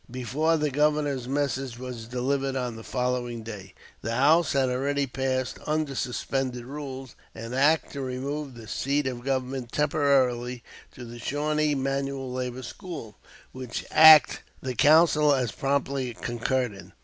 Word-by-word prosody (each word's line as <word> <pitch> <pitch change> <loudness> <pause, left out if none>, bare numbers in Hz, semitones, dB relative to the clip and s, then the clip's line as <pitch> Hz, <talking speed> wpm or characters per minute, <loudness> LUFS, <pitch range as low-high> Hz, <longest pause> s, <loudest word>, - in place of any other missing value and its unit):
Before 130 +7 0
the 150 -1 0
Governor's 145 -3 +1
message 135 -3 -2
was 125 -3 -7
delivered 135 +2 -1
on 125 -3 -2
the 115 - -9
following 125 -2 -2
day, 100 -4 -9 0.3
the 115 +1 -3
House 150 +5 +4
had 135 -2 +2
already 140 +3 0
passed, 130 0 -2
under 155 -2 0
suspended 125 -1 -2
rules, 135 -2 -7 0.2
"An 115 +2 -7
act 145 +5 +3
to 140 - -4
remove 135 +2 -4
the 115 -2 -11
seat 140 +6 -1
of 125 -2 -4
government 130 -2 -2
temporarily 130 -5 +1 0.3
to 125 - -9
the 120 0 -10
Shawnee 150 +3 0
Manual 135 -1 -2
Labor 125 0 -4
School," 145 - -8 0.4
which 130 -2 -6
act 155 -3 +8 0.2
the 130 -1 -4
Council 150 +2 +5
as 125 -4 -1
promptly 135 -3 -1
concurred 120 0 -1
in. 100 - -13
130 Hz, 145 wpm, -26 LUFS, 125-145 Hz, 0.4 s, act